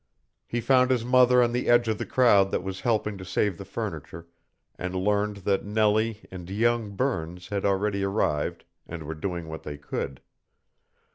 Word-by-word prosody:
He 120 - -2
found 130 +1 +4
his 125 -3 +1
mother 125 0 +5
on 120 - +1
the 125 +1 -1
edge 120 -1 +5
of 110 -1 -1
the - - -4
crowd 115 -8 +4
that - - -2
was 95 0 -5
helping 105 -4 0
to - - -7
save 95 0 -1
the - - -7
furniture, 85 +1 -6 0.5
and 90 +1 -5
learned 105 +2 0
that 100 -1 +1
Nellie 110 +1 +1
and 90 -2 -8
young 110 0 0
Burns 90 -8 -2
had 100 -1 -2
already 100 0 +1
arrived 95 -7 -1 0.2
and 80 -1 -7
were 80 +2 -5
doing 85 +1 -4
what 80 0 -7
they 75 -1 -7
could. 70 -2 -5
100 Hz, 180 wpm, -26 LUFS, 90-115 Hz, 0.5 s, mother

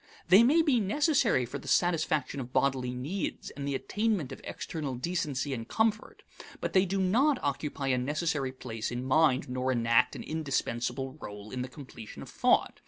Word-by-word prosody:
They 190 +4 +9
may 300 +8 +5
be 280 -7 +3
necessary 230 - +2
for 140 +4 -6
the - - -12
satisfaction 155 -5 +1
of 125 -1 -6
bodily 130 -2 +1
needs 150 +10 -4
and 140 -1 -6
the 140 - -1
attainment 195 - -1
of - - -8
external 150 -6 -4
decency 145 -1 -2
and 115 -2 -5
comfort, 220 - -1 0.4
but - - -3
they 190 0 +4
do 195 +2 -1
not 250 +10 +3
occupy 140 -1 -2
a 125 -1 +2
necessary 145 0 -1
place 115 -4 -5
in 120 +1 -4
mind 135 -1 +3
nor 130 +1 -1
enact 115 0 +3
an - - -6
indispensable 135 -2 -2
role 105 +1 -8
in 125 - -3
the 125 - -3
completion 130 -7 -10
of - - -11
thought. - - +2
140 Hz, 175 wpm, -30 LUFS, 125-185 Hz, 0.4 s, They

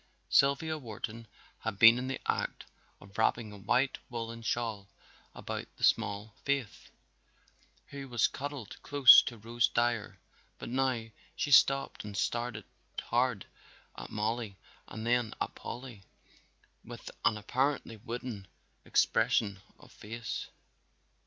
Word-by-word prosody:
Sylvia 155 +3 +3
Wharton 115 -2 -7 0.3
had 110 -3 -4
been 115 +2 +8
in 125 - -4
the 135 - -3
act - - -2 0.3
of 100 0 -16
wrapping 110 -1 +1
a 105 - -10
white 130 +7 +1
woolen 115 -1 -5
shawl 110 -4 -2 0.5
about - - -5
the - - -10
small 100 +1 +1
Faith, 140 -7 -2 1.0
who 140 -1 -8
was 120 -2 +3
cuddled 140 -6 -7
close 140 -3 +9
to 120 - -6
Rose 115 +2 +1
Dyer, 120 -3 0 0.4
but - - -7
now 130 -2 0 0.3
she 145 - -2
stopped 135 0 +4
and 105 -2 -7
stared 120 -2 -1 0.4
hard 120 -4 0 0.5
at - - -8
Mollie 110 -1 -2 0.3
and 110 0 -7
then 120 -2 +1
at - - -2
Polly 120 -4 -8 0.8
with - - -9
an 110 - +3
apparently 130 +1 -1
wooden 115 -3 -6 0.4
expression 100 -3 +2 0.2
of - - -17
face. 115 +1 -6
115 Hz, 125 wpm, -31 LUFS, 110-130 Hz, 1.0 s, close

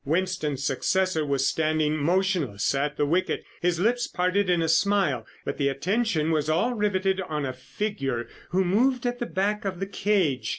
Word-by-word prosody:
Winston's 155 -3 -1
successor 175 +5 +1
was 140 -2 +1
standing 155 -1 +1
motionless 165 - +1
at 145 +2 -1
the 145 - +2
wicket, 175 +6 0 0.2
his 175 -1 +1
lips 240 +5 +1
parted 185 +2 0
in 175 -1 +3
a 165 - +1
smile, 160 - +2 0.2
but - - -4
the 140 -1 +2
attention 165 - 0
of 155 0 0
all 175 +11 +2
was 230 - -6
riveted 190 -2 +1
on 150 -5 -3
a 130 - -3
figure 135 - -3 0.2
who 190 +1 +1
moved 245 +7 +2
at 245 0 -1
the 240 - -2
back 205 +3 -1
of 190 -3 -3
the 195 - -1
cage. 180 - 0
175 Hz, 180 wpm, -26 LUFS, 145-195 Hz, 0.2 s, in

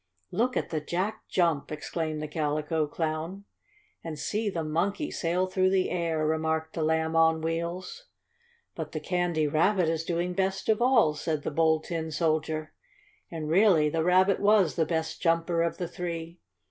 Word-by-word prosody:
"Look 250 +3 0
at - - -2
the 155 -2 -1
Jack 190 +8 -3
jump!" 165 -6 +1
exclaimed 155 0 -3
the - - -3
Calico 150 0 -1
Clown. 160 +5 -3 0.6
"And 160 -2 -5
see 210 +8 -1
the 170 -4 -3
Monkey 180 - -1
sail 175 +2 0
through 185 0 +1
air," 170 -4 0
remarked 160 0 -1
the 165 - -3
Lamb 160 +1 +1
on 160 0 +4
Wheels. 170 - -4 0.7
"But 160 -2 -6
the 155 - -2
Candy 175 -1 0
Rabbit 170 +4 +2
is 165 0 -1
doing 175 +1 -1
best 190 +2 -1
of 220 +1 +3
all," 240 -11 +4
said 150 -1 -3
the - - -2
Bold 160 +1 +2
Tin 165 -2 -3
Soldier. 155 -1 -1 0.6
And 160 -2 -5
really 170 -3 +4
the 160 +1 0
Rabbit 185 +3 +4
was 205 -5 +4
the 160 -2 0
best 160 -1 -2
jumper 165 0 +1
of 170 0 -1
the 175 - -3
three. 170 -1 -6
165 Hz, 165 wpm, -28 LUFS, 155-180 Hz, 0.7 s, on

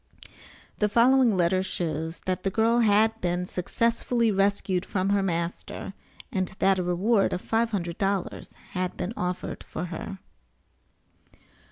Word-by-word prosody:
The 210 - +2
following 240 -1 +4
letter 180 +1 +3
shows 165 -3 -3
that 185 -1 -2
the 195 - 0
girl 225 +4 +2
had 220 0 +3
been 175 0 0
successfully 230 +5 0
rescued 195 -2 +1
from 190 0 -1
her 200 0 +3
master, 170 -2 -3 0.4
and 190 -5 0
that 195 -1 +3
a - - 0
reward 195 +4 +2
of 180 - -2
five 225 +1 +1
hundred 175 -5 -3
dollars 195 -2 -1 0.2
had 185 0 -2
been 195 - -3
offered 180 0 -3
for 175 - -5
her. 195 +4 -6
195 Hz, 140 wpm, -26 LUFS, 180-220 Hz, 0.4 s, following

